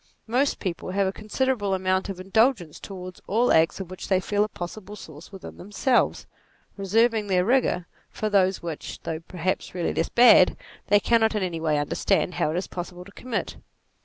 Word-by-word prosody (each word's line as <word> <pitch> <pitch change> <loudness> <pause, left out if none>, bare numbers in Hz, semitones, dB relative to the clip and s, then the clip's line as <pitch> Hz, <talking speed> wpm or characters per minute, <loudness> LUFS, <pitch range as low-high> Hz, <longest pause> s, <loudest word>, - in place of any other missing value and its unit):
Most 255 +5 +1
people 185 -2 -4
have 195 +1 +1
a 190 - 0
considerable 215 -2 -1
amount 185 +1 0
of 190 -2 -6
indulgence 195 - +1
towards 185 -2 -9
all 235 +5 +2
acts 160 +3 +3
of 185 -2 -7
which 185 - -7
they 190 -2 +3
feel 205 +2 0
a - - -1
possible 205 +2 -8
source 155 -5 -12
within 195 -2 -10
them 200 - -11
selves, 245 +4 +1 0.5
reserving 220 +2 +1
their 180 -2 +2
rigour 240 -7 +2 0.2
for 215 - -3
those 190 -3 +2
which, 165 -3 -6
though 160 -1 -3
perhaps 180 +2 -3
really 175 -2 -1
less 165 - -1
bad, 235 -6 +6 0.3
they 205 - +5
cannot 225 0 +2
in 210 - 0
any 175 -3 -3
way 155 -2 +1
under 145 0 -2
stand 195 -2 +1
how 160 - 0
it 160 - -2
is 185 - -2
possible 180 0 -7
to 200 - -14
commit. 250 +3 -4
190 Hz, 190 wpm, -25 LUFS, 180-215 Hz, 0.5 s, bad